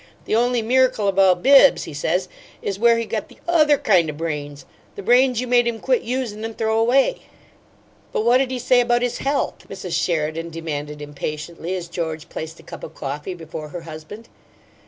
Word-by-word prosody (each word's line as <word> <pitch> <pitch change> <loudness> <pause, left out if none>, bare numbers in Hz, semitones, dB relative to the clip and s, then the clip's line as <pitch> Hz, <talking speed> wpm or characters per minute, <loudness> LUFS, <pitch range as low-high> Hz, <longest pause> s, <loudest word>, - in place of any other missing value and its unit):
The - - -3
only 240 0 +2
miracle 255 -3 +2
about 190 -2 +3
Bibbs,' 275 0 +7
he - - -8
says, 175 +6 -1 0.4
'is 195 -1 -3
where 235 +1 +5
he 230 - -2
got - - -3
the - - -17
OTHER 305 -4 +4
kind 175 -10 +3
o' - - -4
brains 145 -2 -5 0.3
the 405 - -7
brains 250 -1 +4
you 255 - -1
made 245 -1 +3
him 230 -1 -2
quit - - +1
usin' 235 -4 -3
and 225 0 -6
throw 220 0 +1
away.'" 270 - +2 0.9
"But 215 - -1
what'd 250 +2 +4
he 260 - -3
say 245 0 +3
about 240 0 +1
his 245 0 -2
health?" 280 +1 -2
Mrs. 190 -3 -6
Sheridan 165 -1 -1
demanded, 150 -2 -5
impatiently, 155 +4 -5
as 175 -2 -5
George 160 -2 -5
placed 160 +1 -7
a - - -15
cup - - -10
of - - -9
coffee 145 +6 -5
before 160 -2 -8
her 175 +2 -7
husband. 165 +7 -10
200 Hz, 190 wpm, -21 LUFS, 160-245 Hz, 0.9 s, Bibbs